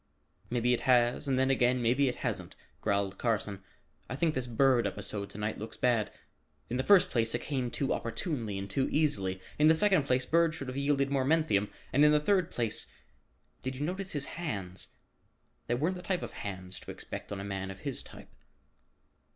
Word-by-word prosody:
"Maybe 120 0 +2
it 120 - +1
has 120 +2 +4
and 135 -2 +1
then 130 +1 +3
again 125 -1 +3
maybe 125 +4 +3
it 125 - -1
hasn't," - - -2 0.3
growled 100 -2 0
Carson. 105 -4 -1 0.5
"I 130 - -3
think 160 +2 +1
this 130 -4 -2
Bird 125 +1 +3
episode 100 -1 -5
to - - -10
night 105 +1 -3
looks 110 +1 -7
bad. 120 -4 +1 0.6
In 125 - 0
the 130 - 0
first 195 +3 +5
place, 115 -1 +2
it 120 - -3
came 130 -4 -1
too 135 +3 -1
opportunely 115 - -3
and 95 0 -4
too 130 +7 0
easily. 100 -12 +1 0.2
In 150 - +6
the 160 - +7
second 185 -5 +3
place 130 0 +2
Bird 165 +1 +3
should 135 -4 -6
have 125 - -5
yielded 140 0 +1
more 135 -2 +2
menthium, 140 -9 +2 0.2
and 145 - +5
in 150 - +7
the 150 - +5
third 185 +2 +2
place, 115 -3 +1 0.7
did 130 0 -4
you 130 - -7
notice 185 +3 -3
his 145 -2 -1
hands? 100 - -5 0.8
They 120 - +1
weren't 160 +9 0
the - - -7
type 180 0 -1
of - - -6
hands 95 -2 -6
to - - -13
expect - - -7
on 100 - -4
a - - -5
man 95 -1 -4
of 95 - -9
his - - -3
type." - - -13
125 Hz, 200 wpm, -31 LUFS, 105-150 Hz, 0.8 s, the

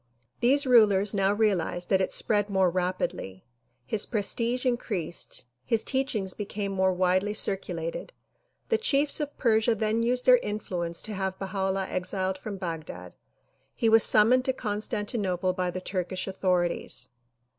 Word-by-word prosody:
These 280 +4 +3
rulers 210 -5 +4
now 195 -1 +2
realized 200 -4 0
that 190 -1 +4
it 190 - -1
spread 205 -1 0
more 190 -3 +2
rapidly. 180 - -3 0.4
His 205 +10 0
prestige 235 +3 -1
increased, 205 - -3 0.2
his 225 - +1
teachings 235 -9 -1
became 205 -1 -4
more 190 -1 +2
widely 185 +3 +1
circulated. 180 - -1 0.6
The 455 - +2
chiefs 290 -10 +2
of 295 -1 -4
Persia 225 -1 +2
then 220 +1 0
used 250 +2 0
their 250 -1 +7
influence 175 -5 -3
to 215 - -6
have 190 -1 -3
Baha 195 0 -3
'Ullah 190 0 -1
exiled 185 +1 -2
from 200 0 -6
Baghdad. 160 - -6 0.6
He 225 - +1
was 225 0 +6
sununoned 245 +4 +4
to 260 - +1
Con 210 -5 -3
stantinople 195 -4 -1
by 180 -1 -1
the 185 +1 -5
Turkish 185 0 -3
authorities. 180 -8 -1
195 Hz, 145 wpm, -27 LUFS, 185-225 Hz, 0.6 s, their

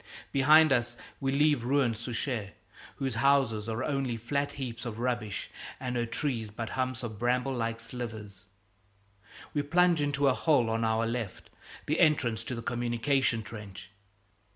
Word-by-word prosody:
Behind 155 +3 +6
us 120 -2 0 0.2
we 135 -1 0
leave 145 -2 +3
ruined 130 -2 +2
Souchez, 115 -2 -3 0.4
whose 135 -2 -2
houses 125 -6 +3
are 115 +3 -2
only 135 -5 -1
flat 140 +5 -2
heaps 120 -4 -5
of 115 -3 -5
rubbish 115 -4 -2 0.3
and 125 -1 -3
her 120 -1 0
trees 115 -4 -2
but 110 +2 -5
humps 130 -1 -2
of 110 -3 -6
bramble 125 +2 +1
like 115 -2 -2
slivers. 110 -4 -7 1.1
We 145 - +1
plunge 170 +2 +3
into 145 -1 +1
a 135 - +5
hole 125 -6 +2
on 115 0 0
our 110 0 +2
left, 115 -4 -4 0.3
the 150 - 0
entrance 125 -9 +3
to 130 - -3
the 115 - -6
communication 120 0 +1
trench. 100 -1 -9
120 Hz, 155 wpm, -30 LUFS, 115-140 Hz, 1.1 s, Behind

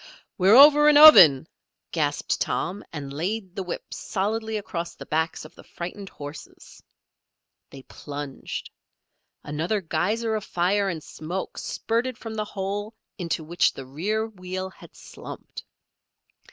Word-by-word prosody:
"We're 195 +3 +5
over 295 +2 +8
an 295 - +6
oven!" 180 - +9 0.4
gasped 145 -3 -1
Tom, 195 +3 -2
and 140 -3 -7
laid 185 +5 -4
the - - -3
whip 180 -2 -6
solidly 220 +2 -2
across 170 -4 -5
the - - -10
backs 160 0 -2
of 155 - -13
the - - -15
frightened 185 +3 -8
horses. 145 +1 -11 0.9
They 135 -1 -12
plunged. 145 -1 -7 0.7
Another 160 +8 -2
geyser 205 +7 -1
of 215 -2 -2
fire 195 +3 0
and 160 -4 -5
smoke 175 +5 -6
spurted 235 +2 -2
from 225 -1 -7
the 215 -1 -3
hole 205 +2 -5 0.2
into 170 -2 -2
which 170 +3 +1
the 135 - -9
rear 200 +12 -2
wheel 185 -2 -6
had - - -16
slumped. - - -10
185 Hz, 135 wpm, -25 LUFS, 160-215 Hz, 0.9 s, oven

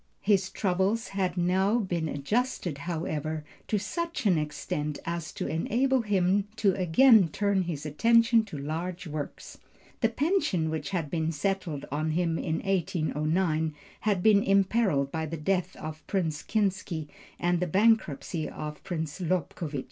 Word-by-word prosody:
His 195 -2 +2
troubles 190 +3 0
had 185 -2 -1
now 190 +5 +2
been 175 -7 -1
adjusted, 175 - -1
however, 155 -2 -3 0.2
to 215 - +1
such 335 - -3
an 190 -4 +5
extent 150 0 -3
as 170 -2 -3
to - - -4
enable 250 +10 +1
him 200 -1 +2
to 205 -3 +3
again 200 +3 +6
turn 200 +4 +1
his 165 -4 -4
attention 230 +8 +4
to 195 -8 -7
large 165 +6 -4
works. 150 -2 -6 0.4
The 225 - +3
pension 235 - +1
which 160 - -3
had 170 -7 -2
been 160 -1 0
settled 165 -2 -2
on 155 +2 -1
him 165 -1 0
in 160 -2 -1
1809 160 -3 0 0.2
had 200 -4 0
been 210 -2 +6
imperilled 195 -8 +2
by 160 -1 -2
the 165 +2 -4
death 180 +4 -1
of 155 0 -7
Prince 160 -6 -1
Kinsky 190 -7 -1 0.3
and 175 0 +1
the 180 - 0
bankruptcy 185 -5 +1
of 150 0 -7
Prince 160 -2 -4
Lobkowitz. 165 -4 -2
180 Hz, 145 wpm, -28 LUFS, 155-200 Hz, 0.4 s, again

